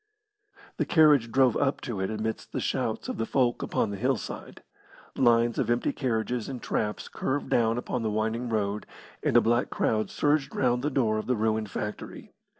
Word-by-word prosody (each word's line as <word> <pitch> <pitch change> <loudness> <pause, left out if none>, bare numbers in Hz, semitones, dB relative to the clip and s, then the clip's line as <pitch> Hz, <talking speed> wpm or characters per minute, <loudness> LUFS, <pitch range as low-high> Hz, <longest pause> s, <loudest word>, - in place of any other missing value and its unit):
The - - 0
carriage 150 -8 +5
drove 130 -2 +4
up 140 -1 +1
to 115 -6 -4
it 95 - -1
amidst 110 0 -4
the - - -1
shouts - - -2
of - - -4
the 115 - 0
folk 125 -3 +1
upon 105 - -1
the 100 - -4
hillside. 125 +2 -3 0.5
Lines 120 -2 +3
of 120 - 0
empty 120 0 +1
carriages 120 -2 -2
and 130 -2 -5
traps 105 -2 -2
curved 140 +2 -3
down 115 0 +3
upon 125 0 -3
the 110 - -1
winding 110 +3 -1
road, 105 -2 -1 0.3
and - - +3
a - - +7
black 120 +2 +1
crowd 110 -2 0
surged 145 -2 0
round 125 -1 +1
the 145 - 0
door 115 -6 +1
of - - -6
the 125 - +2
ruined 110 -1 0
factory. 105 +1 -6
115 Hz, 185 wpm, -27 LUFS, 110-130 Hz, 0.5 s, a